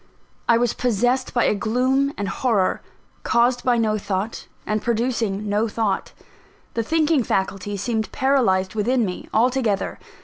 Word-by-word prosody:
I 235 Hz, -, +6 dB
was 240 Hz, -1 st, +1 dB
possessed 245 Hz, +2 st, 0 dB
by 240 Hz, -, +2 dB
a -, -, +3 dB
gloom 255 Hz, +6 st, +1 dB
and 200 Hz, -, -2 dB
horror, 210 Hz, -5 st, 0 dB, 0.4 s
caused 240 Hz, +1 st, +2 dB
by 245 Hz, -2 st, +3 dB
no 215 Hz, -2 st, +1 dB
thought, 200 Hz, +2 st, -3 dB, 0.2 s
and 215 Hz, 0 st, -1 dB
producing 225 Hz, -3 st, -1 dB
no 210 Hz, +2 st, +1 dB
thought: 215 Hz, -3 st, -1 dB, 0.6 s
the 230 Hz, -, 0 dB
thinking 310 Hz, +3 st, +2 dB
faculty 195 Hz, -1 st, -2 dB
seemed 220 Hz, +2 st, -2 dB
paralysed 235 Hz, -9 st, +2 dB
within 230 Hz, +3 st, +1 dB
me, 180 Hz, -2 st, -6 dB
altogether. 235 Hz, -3 st, +1 dB
230 Hz, 140 wpm, -22 LUFS, 205-250 Hz, 0.6 s, I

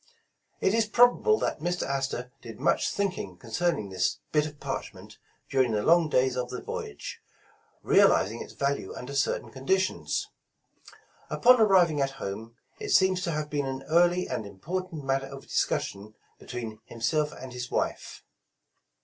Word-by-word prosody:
It 190 Hz, -, +3 dB
is 225 Hz, -1 st, +2 dB
probable 245 Hz, -, +5 dB
that -, -, -2 dB
Mr. 175 Hz, +3 st, -1 dB
Astor 135 Hz, -2 st, -2 dB
did 115 Hz, -2 st, -10 dB
much -, -, +2 dB
thinking 185 Hz, -, -2 dB
concerning 115 Hz, -, -1 dB
this 95 Hz, -, 0 dB
bit 150 Hz, 0 st, +2 dB
of 150 Hz, -1 st, -11 dB
parchment -, -, -6 dB, 0.3 s
during 130 Hz, -4 st, +2 dB
the 105 Hz, -1 st, 0 dB
long 165 Hz, -1 st, +4 dB
days 130 Hz, -2 st, +2 dB
of 125 Hz, -1 st, -2 dB
the 125 Hz, -, -5 dB
voyage, 70 Hz, 0 st, -6 dB, 0.6 s
realizing 110 Hz, +4 st, +4 dB
its -, -, -9 dB
value 140 Hz, -8 st, -2 dB
under 130 Hz, +3 st, -7 dB
certain 135 Hz, -, 0 dB
condi 135 Hz, +8 st, +1 dB
tions. 185 Hz, 0 st, -2 dB, 1.0 s
Upon 250 Hz, -1 st, +5 dB
arriving 180 Hz, -8 st, +5 dB
at 135 Hz, 0 st, 0 dB
home, 110 Hz, +2 st, -6 dB, 0.2 s
it 425 Hz, -1 st, -5 dB
seems 190 Hz, -1 st, +4 dB
to 170 Hz, -, -1 dB
have 150 Hz, -1 st, -3 dB
been 145 Hz, -2 st, -1 dB
an 135 Hz, 0 st, -4 dB
early 175 Hz, +3 st, +3 dB
and 125 Hz, -3 st, -3 dB
important 165 Hz, -, -5 dB
matter 135 Hz, 0 st, 0 dB
of 135 Hz, 0 st, -9 dB
discussion 105 Hz, +2 st, -2 dB, 0.2 s
between 115 Hz, -3 st, -6 dB
him 115 Hz, -, -11 dB
self 150 Hz, +5 st, +1 dB
and 130 Hz, -1 st, -9 dB
his 125 Hz, 0 st, -5 dB
wife. -, -, -3 dB
140 Hz, 160 wpm, -28 LUFS, 125-175 Hz, 1.0 s, probable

